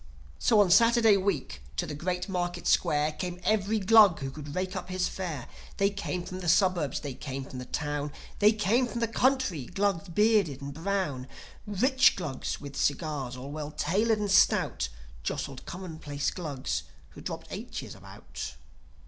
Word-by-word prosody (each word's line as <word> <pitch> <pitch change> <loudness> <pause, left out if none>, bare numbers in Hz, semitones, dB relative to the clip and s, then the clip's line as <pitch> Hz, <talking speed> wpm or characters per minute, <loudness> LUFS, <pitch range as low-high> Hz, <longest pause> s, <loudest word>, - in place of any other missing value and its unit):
So 220 - +4
on 190 -3 +3
Saturday 230 +1 +6
week 185 - -1 0.2
to - - 0
the 150 - -5
Great 180 +5 -2
Market 175 -2 -2
Square 150 +1 +3
Came 180 -1 -3
every 215 0 +2
Glug 210 -3 +7
who 135 -2 -4
could 145 0 -8
rake 185 +1 -2
up 185 - -5
his 185 0 0
fare. 165 -9 -5 0.3
They 200 0 +3
came 185 -3 -3
from 185 +1 -6
the 175 -2 -1
suburbs, 175 -6 +2
they 140 -3 -5
came 135 +1 -5
from 130 - -8
the 125 - -6
town, 145 +1 -3 0.3
There 210 +1 +7
came 225 +4 +2
from 240 - -4
the 230 - +1
country 235 - +1
Glugs 200 -2 -1
bearded 205 - +3
and 140 0 -6
brown, 160 -6 -2 0.4
Rich 260 +7 +4
Glugs, 150 -8 -4
with 140 -1 -9
cigars, 145 -4 -1
all 135 +3 -7
well 150 0 -5
tailored 205 +9 +1
and 205 -2 -1
stout, 190 - +3 0.3
Jostled 130 - -4
commonplace 160 -5 -4
Glugs 145 -7 -3 0.3
who - - -12
dropped - - -6
aitches - - -6
about. 70 - -8
180 Hz, 165 wpm, -29 LUFS, 145-200 Hz, 0.4 s, Glug